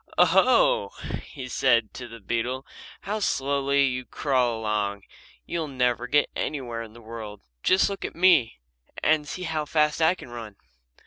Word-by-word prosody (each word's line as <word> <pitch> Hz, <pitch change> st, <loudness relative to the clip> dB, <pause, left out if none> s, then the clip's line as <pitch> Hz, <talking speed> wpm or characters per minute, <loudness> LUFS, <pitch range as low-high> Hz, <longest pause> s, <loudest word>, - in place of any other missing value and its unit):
"O 180 Hz, -, +7 dB
ho!" 260 Hz, -, +4 dB, 0.4 s
he 130 Hz, -3 st, -8 dB
said 120 Hz, -3 st, +2 dB
to 125 Hz, -, -7 dB
the 115 Hz, 0 st, -11 dB
beetle, 120 Hz, +5 st, -2 dB, 0.4 s
"how 210 Hz, +2 st, -3 dB
slowly 140 Hz, -5 st, +1 dB
you 130 Hz, -1 st, -2 dB
crawl 125 Hz, -2 st, 0 dB
along. 105 Hz, -2 st, -1 dB, 0.4 s
You'll 165 Hz, -2 st, -3 dB
never 125 Hz, -3 st, 0 dB
get 145 Hz, +4 st, +2 dB
anywhere 120 Hz, -6 st, -3 dB
in 110 Hz, -2 st, -9 dB
the 120 Hz, -, -14 dB
world. 110 Hz, -2 st, -8 dB, 0.2 s
Just 185 Hz, -, +4 dB
look 200 Hz, -1 st, -5 dB
at -, -, -5 dB
me 170 Hz, -, +4 dB, 0.5 s
and 155 Hz, -1 st, +3 dB
see 180 Hz, -, -5 dB
how 160 Hz, -3 st, -2 dB
fast 150 Hz, +1 st, +1 dB
I 160 Hz, +3 st, +4 dB
can 155 Hz, -, -12 dB
run." 115 Hz, -4 st, -8 dB
130 Hz, 165 wpm, -26 LUFS, 115-155 Hz, 0.5 s, O